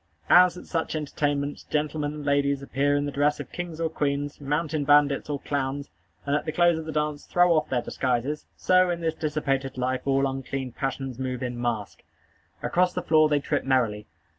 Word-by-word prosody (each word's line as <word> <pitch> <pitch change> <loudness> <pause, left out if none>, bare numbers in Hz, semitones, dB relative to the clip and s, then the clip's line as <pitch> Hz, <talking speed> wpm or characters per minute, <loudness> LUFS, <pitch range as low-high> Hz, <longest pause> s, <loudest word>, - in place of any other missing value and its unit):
As, 180 0 +7
at - - -10
such 165 -1 -2
entertainments, 145 -1 -2
gentlemen 150 -1 -1
and 150 -1 -7
ladies 140 -1 +1
appear 140 +2 +1
in 145 0 0
the 145 - -3
dress 145 +1 +1
of - - -7
kings 175 -2 -6
or 165 - +1
queens, 145 -2 -2
mountain 150 +1 -1
bandits 145 0 +3
or 145 -1 -2
clowns, 140 0 -3 0.3
and 140 0 +1
at 150 - 0
the - - -1
close 175 0 +3
of 160 - -7
the 160 - -4
dance 150 -1 -2
throw 175 -1 +4
off 155 -1 +1
their 125 -2 0
disguises, 130 +3 -2
so, 185 0 +4
in 170 -1 -2
this 165 -1 0
dissipated 140 -4 -2
life, 130 0 -1
all 135 0 +3
unclean 135 -1 -4
passions 135 -1 -4
move 130 -1 -3
in 120 -1 -4
mask. 115 -4 -3 0.6
Across 180 0 +2
the 180 - -3
floor 155 -2 +4
they 145 -1 +3
trip 145 0 -1
merrily. 115 -6 +1
145 Hz, 195 wpm, -26 LUFS, 135-155 Hz, 0.6 s, As